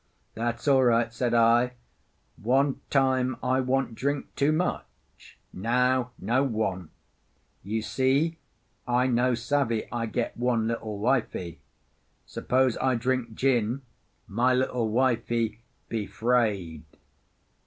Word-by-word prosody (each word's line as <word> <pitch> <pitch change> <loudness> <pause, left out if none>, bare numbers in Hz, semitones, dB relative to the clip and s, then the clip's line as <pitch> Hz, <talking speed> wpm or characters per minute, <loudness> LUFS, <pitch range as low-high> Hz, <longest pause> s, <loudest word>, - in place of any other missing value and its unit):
"That's 120 +3 -3
all 135 -2 +5
right," 115 -1 +2
said 120 0 0
I. 120 +2 +4 0.6
"One 135 +4 +1
time 130 -2 +2
I 130 +1 +2
want 130 -1 0
drink 140 +4 -3
too 140 +2 +2
much; 175 +4 -5 0.2
now 125 +4 +1
no 120 +7 +1
want. 105 - -2 0.7
You 110 +3 -3
see, 140 +8 +1 0.5
I 125 +1 +2
no 125 0 +2
savvy 120 -2 0
I 115 -1 -2
get 120 +1 -2
one 120 -2 0
little 110 -2 -3
wifie. 105 -7 -1 0.7
Suppose 130 -1 0
I 130 -1 +2
drink 120 -1 -1
gin, 125 0 +1 0.4
my 125 +5 +1
little 125 -3 0
wifie 115 -2 0 0.3
he 110 -3 -3
'fraid." 100 -7 0
120 Hz, 115 wpm, -27 LUFS, 115-130 Hz, 0.7 s, all